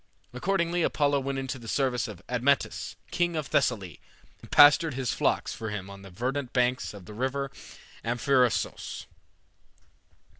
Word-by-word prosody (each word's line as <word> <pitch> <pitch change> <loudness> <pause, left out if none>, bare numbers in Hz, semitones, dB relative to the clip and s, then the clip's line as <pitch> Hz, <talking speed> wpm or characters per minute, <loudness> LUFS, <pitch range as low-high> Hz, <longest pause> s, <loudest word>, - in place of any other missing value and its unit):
Accordingly 175 +4 0
Apollo 145 -3 +2
went 135 0 -3
into 135 0 -4
the 115 - -11
service 125 -2 0
of 105 -6 -10
Admetus, 125 +3 0 0.2
king 175 -1 0
of 155 -2 -2
Thessaly, 100 - 0 0.4
and - - -13
pastured 145 0 +7
his 130 -3 -1
flocks - - 0
for 110 - -5
him 100 -2 -5
on 100 0 -11
the 100 - -11
verdant 125 +7 -3
banks 125 -3 +1
of 95 -3 -11
the 105 - -10
river 135 +4 -2 0.5
Amphrysos. 125 +1 0
130 Hz, 145 wpm, -28 LUFS, 115-140 Hz, 0.5 s, pastured